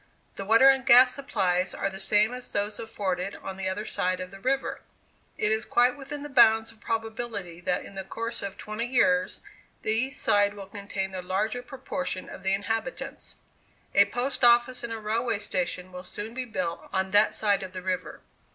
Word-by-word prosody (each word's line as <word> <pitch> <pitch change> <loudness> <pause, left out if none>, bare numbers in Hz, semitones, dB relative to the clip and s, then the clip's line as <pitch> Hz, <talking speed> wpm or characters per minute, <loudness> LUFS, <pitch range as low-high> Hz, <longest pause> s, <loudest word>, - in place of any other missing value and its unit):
The 195 - -6
water 230 +6 +6
and 270 -1 +5
gas 250 0 +7
supplies 185 -10 0
are - - -1
the 190 0 -6
same 210 +4 +3
as 250 0 -7
those 205 +1 -2
afforded 195 -4 -3
on 190 - -7
the 190 0 -2
other 205 +3 -3
side 185 -2 -1
of 185 0 -6
the 195 - -11
river. 270 +5 -1 0.6
It 210 - +1
is 220 0 +1
quite 245 +1 +3
within 285 +1 -7
the - - -5
bounds 225 -5 +5
of 220 -1 -21
probability 225 -6 -4
that 180 0 -1
in - - -11
the 195 0 -5
course 230 +4 -4
of 200 -1 -5
twenty 215 +3 -4
years, 270 +2 +2 0.4
the 215 - 0
east 255 +5 0
side 205 0 +3
will 200 -1 -8
contain 195 -1 -5
the 185 -1 -5
larger 210 +7 -1
proportion 270 -5 -4
of - - -9
the 190 - 0
inhabitants. 260 +7 -4 0.6
A 200 - +7
post 245 +6 -3
office 240 +1 +5
and 235 - -4
a 225 - -3
railway 225 +1 -1
station 185 -2 -3
will 180 0 -8
soon 210 +4 -7
be 255 +1 -4
built 185 -7 -4
on 190 0 -1
that 205 +1 +4
side 205 -2 +2
of 190 -1 -7
the 185 -1 -6
river. 185 -1 -3
215 Hz, 195 wpm, -27 LUFS, 190-245 Hz, 0.6 s, gas